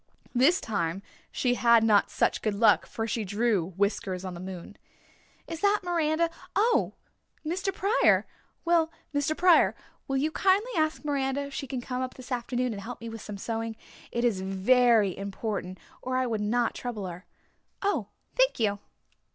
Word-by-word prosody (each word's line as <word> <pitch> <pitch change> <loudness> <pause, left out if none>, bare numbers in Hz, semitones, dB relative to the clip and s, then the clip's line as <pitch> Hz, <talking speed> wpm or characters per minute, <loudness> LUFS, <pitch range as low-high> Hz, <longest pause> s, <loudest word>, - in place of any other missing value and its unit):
This 270 +9 +4
time 195 -3 -2 0.3
she 250 -1 +1
had 235 0 +5
not 210 -2 +4
such - - +1
good 215 -2 -1
luck 215 0 +4
for 225 - -3
she 225 0 -2
drew 205 -3 +1
Whiskers 195 -2 -1
on 185 - -5
the 175 - -8
moon. 185 -1 -8 0.7
"Is 330 -1 -6
that 410 +2 +3
Miranda? 335 -1 +1 0.2
Oh 450 +4 +2 0.5
Mr. 375 +5 -1
Pryor! 395 +5 +3 0.4
Well, 335 -1 +3 0.2
Mr. 285 +2 0
Pryor, 360 -1 +5 0.3
will 270 - 0
you 300 +4 0
kindly 390 +8 +2
ask 310 -2 0
Miranda 275 -1 0
if 280 0 -8
she 275 - -4
can 255 0 -4
come 250 +1 -4
up 255 0 -4
this 255 +1 -12
afternoon 245 0 -1
and 200 - -6
help 240 +3 -7
me 230 - -7
with 225 -1 -8
some 210 -1 -7
sewing. 225 +2 -3 0.4
It 235 +1 0
is 205 -6 +1
very 210 +1 +3
important, 195 -2 -4 0.2
or 255 0 -2
I 255 - +1
would 225 -3 -2
not 230 +3 +1
trouble 230 -5 -5
her. 180 +1 -8 0.6
Oh 405 +1 0 0.3
thank - - +3
you." 205 -3 +1
240 Hz, 170 wpm, -28 LUFS, 205-305 Hz, 0.7 s, had